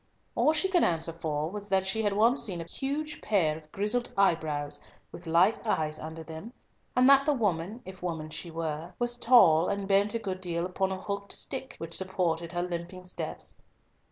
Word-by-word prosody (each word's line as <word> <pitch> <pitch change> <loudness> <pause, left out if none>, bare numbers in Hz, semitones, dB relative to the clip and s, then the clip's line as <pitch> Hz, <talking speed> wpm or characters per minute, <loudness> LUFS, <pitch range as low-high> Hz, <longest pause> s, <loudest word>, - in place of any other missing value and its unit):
All 305 - +3
she 315 +4 +2
could 365 -2 +3
answer 165 0 +2
for 155 -1 -2
was 205 0 -6
that 190 0 +2
she 195 +4 0
had 205 -2 +1
once 230 +6 +4
seen 180 -5 -2
a - - -3
huge 290 - -4
pair 175 -8 +2
of 155 -1 -13
grizzled 215 +5 -1
eyebrows, 150 -6 +2 0.3
with 175 - -10
light 175 +7 +3
eyes 155 -8 -1
under 160 +1 -7
them, 160 +9 -9 0.4
and 250 +1 +5
that 275 +1 +6
the 300 - +4
woman, 205 -2 -1
if 190 0 -10
woman 160 -3 -4
she 170 - -6
were, 160 0 -4
was 240 0 -1
tall, 180 -11 +6
and 200 -1 -2
bent 200 +2 +3
a - - +3
good 190 -4 -4
deal 170 -1 -1
upon 190 +1 -1
a 190 - -3
hooked 200 +1 -4
stick, 265 -1 -4
which 165 0 -7
supported 170 -3 -1
her 175 0 0
limping 180 +1 -5
steps. 180 - -6
185 Hz, 195 wpm, -29 LUFS, 165-215 Hz, 0.4 s, that